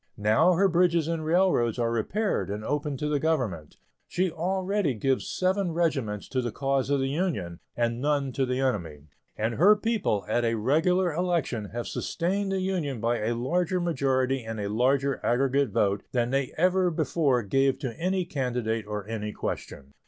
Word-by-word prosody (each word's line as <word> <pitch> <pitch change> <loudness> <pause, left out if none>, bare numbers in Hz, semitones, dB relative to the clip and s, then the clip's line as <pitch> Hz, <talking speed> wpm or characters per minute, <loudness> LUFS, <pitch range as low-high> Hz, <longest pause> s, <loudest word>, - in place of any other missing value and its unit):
Now 110 - +4
her 195 +3 +4
bridges 170 -2 +2
and 165 -1 -2
railroads 160 - +2
are 115 -1 0
repaired 115 - -1
and 105 +2 -4
open 145 -1 -2
to 150 - -2
the 150 -1 +1
Government; 125 - -2 0.3
she 185 0 0
already 185 - -1
gives 130 +5 0
seven 185 -1 0
regiments 135 - -1
to 130 - 0
the 120 -2 -3
cause 135 +2 -1
of 140 -1 +2
the 135 - 0
Union, 135 - -2 0.2
and 120 0 0
none 140 -2 0
to 130 +1 -1
the 125 +1 -1
enemy; 80 - -2 0.3
and 110 +2 -1
her 190 - +6
people, 210 - -1
at 120 +3 +1
a 115 0 +1
regular 165 - +2
election, 165 -10 -1
have 120 +3 -5
sustained 195 +3 -2
the 190 -1 0
Union 170 -9 -2
by 115 +2 0
a 115 +2 -1
larger 175 +9 0
majority 135 -6 0
and 110 -1 -5
a 100 -1 -2
larger 130 +5 +1
aggregate 135 +2 +2
vote 100 -2 +1
than 120 -1 +1
they 135 -1 0
ever 185 +2 +3
before 150 -5 +1
gave 135 +6 +2
to 135 -4 -4
any 185 +1 0
candidate 120 -7 -2
or 105 -1 -5
any 105 -1 -4
question. 70 -8 -6
135 Hz, 175 wpm, -27 LUFS, 115-170 Hz, 0.3 s, her